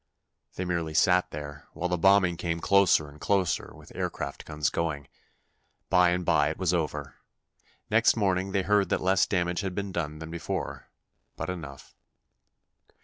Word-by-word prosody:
They 90 - -3
merely 85 -3 -2
sat 90 +2 +4
there, 75 0 -8
while 90 +2 -2
the 90 - 0
bombing 95 0 +4
came 85 0 -2
closer 100 -5 +4
and 75 +1 -15
closer, 95 -3 0
with - - -15
aircraft - - -4
guns 75 -1 -1
going. 75 -4 -2 0.8
By 90 -1 +5
and 90 0 -1
by 75 -3 +3
it 80 - -5
was 90 -2 0
over. 75 -5 -3 0.7
Next 115 +2 +4
morning, 95 -2 +1
they 95 -1 +1
heard 100 0 +2
that - - +1
less 95 0 +3
damage 90 -2 0
had 95 -2 -4
been 100 -1 -3
done 75 -4 -3
than 80 +1 -8
before, 85 -1 -5 0.5
but - - -4
enough. 75 -6 -9
90 Hz, 160 wpm, -28 LUFS, 80-95 Hz, 0.8 s, By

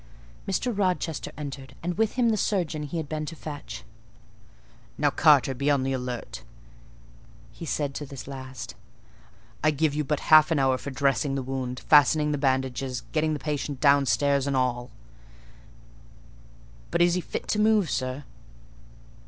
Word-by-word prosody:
Mr. 220 +5 -1
Rochester 180 -5 -1
entered, 140 -2 -7
and 175 +1 -2
with 220 0 +1
him 245 -2 +2
the 220 - +2
surgeon 175 -8 -1
he 150 +3 -4
had 160 -2 -3
been 155 +1 -3
to 165 - -6
fetch. 140 -8 -8 1.1
"Now, - - +2
Carter, 135 - +4
be 140 +3 -1
on 140 -2 +2
the 135 0 -1
alert," 125 -2 -5 1.1
he 165 - -9
said 145 -1 -1
to 145 - -5
this 135 -2 -9
last: 130 -3 -7 0.9
"I 155 - +5
give 155 0 +1
you 150 +1 -1
but 150 0 -1
half 155 0 +8
an 165 - +1
hour 135 -2 +2
for - - -6
dressing 135 0 0
the 135 - -2
wound, 125 -1 -4
fastening 150 +1 +5
the 145 - -1
bandages, 130 -1 -1
getting 155 0 +1
the - - -1
patient 145 -2 -3
downstairs 140 0 +3
and 140 - 0
all." 125 -1 -1 2.0
"But 170 - +3
is 175 0 +3
he 180 - 0
fit - - -6
to 210 - +1
move, 215 -3 +4
sir?" 130 +2 -2
145 Hz, 160 wpm, -26 LUFS, 130-160 Hz, 2.0 s, half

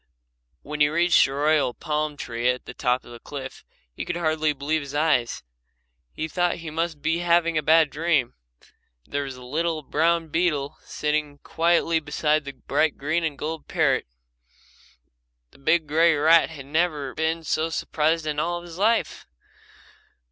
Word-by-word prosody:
When 150 +1 -5
he 145 - +6
reached 170 +2 +4
the 135 - -4
royal 145 -3 +2
palm 150 -2 -2
tree 120 -1 -1
at 125 0 -2
the - - -8
top 125 +1 0
of - - -13
the 120 - -10
cliff 135 0 -8 0.3
he - - -5
could 175 - -3
hardly 155 -2 +1
believe 150 +2 -1
his 140 0 -8
eyes. 145 -6 +1 0.7
He 160 - -4
thought 175 +2 0
he 165 -2 -8
must 160 -2 -3
be 165 +2 +1
having 170 -1 +2
a 155 - +2
bad 155 0 +4
dream. 150 -5 +1 0.7
There 145 - -2
was 135 -1 -7
the 125 - -12
little 160 +3 -1
brown 165 +3 +1
beetle 150 -4 -1
sitting 150 -1 -2
quietly 165 0 +2
beside 150 0 0
the 140 - -6
bright 145 +3 0
green 155 +4 -1
and 155 -3 -2
gold 160 +1 -5
parrot. - - +1 1.4
The - - -21
big 160 +4 +2
grey 160 +2 +3
rat 160 +3 +5
had 145 -5 -9
never 150 -2 -1
been 160 +1 -1
so 160 +1 0
surprised 160 0 0
in 150 -1 -2
all 175 +2 -2
his 175 0 -10
life. 225 +3 +1
155 Hz, 165 wpm, -24 LUFS, 145-165 Hz, 1.4 s, he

